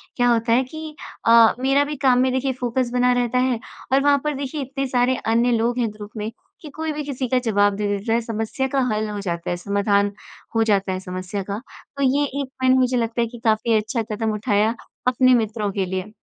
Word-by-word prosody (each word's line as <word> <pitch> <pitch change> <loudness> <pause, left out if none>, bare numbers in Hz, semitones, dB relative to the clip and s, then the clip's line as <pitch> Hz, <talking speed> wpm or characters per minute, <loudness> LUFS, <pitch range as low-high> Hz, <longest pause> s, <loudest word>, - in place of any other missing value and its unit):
क्या 245 -1 +3
होता 230 0 +2
है 255 +3 +4
कि 310 +3 -8 0.3
अ, 230 -1 +7
मेरा 270 +2 +3
भी 295 +1 -4
काम 250 -1 +5
में 260 0 +3
देखिए 260 +1 0
फोकस 245 0 -1
बना 250 0 +3
रहता 245 0 0
है 250 -2 +1 0.3
और 270 +1 +4
वहाँ 285 0 +5
पर 300 0 0
देखिए 280 +2 -4
इतने 270 +1 -3
सारे 250 0 +2
अन्य 235 +2 +2
लोग 235 +1 +1
हैं 235 -2 +1
ग्रुप 210 0 -10
में 215 +1 -3 0.3
कि 305 - -9
कोई 320 0 -2
भी 300 0 -4
किसी 270 -2 -3
का 255 - +2
जवाब 205 -2 +3
दे 205 +1 -2
देता 205 +2 -1
है 235 - +2
समस्या 225 +3 -2
का 270 +1 0
हल 215 0 -1
हो 205 -1 -4
जाता 170 -2 -3
है, 175 - 0
समाधान 200 +2 +1 0.4
हो 225 - +4
जाता 200 -3 +1
है 185 - -3
समस्या 185 +2 -5
का। 200 - -2 0.4
तो 280 - 0
ये 275 +2 +3 0.2
एक 275 - -4
पॉइंट 260 0 +4
मुझे 255 0 +2
लगता 230 0 -1
है 235 - +1
कि 240 +1 -11
काफ़ी 220 +1 +2
अच्छा 220 +3 -1
कदम 220 +1 -1
उठाया 210 +1 +1 0.3
अपने 255 +1 +4
मित्रों 220 -3 0
के 195 -1 -1
लिए। 190 +3 -4
235 Hz, 230 wpm, -22 LUFS, 210-260 Hz, 0.4 s, अ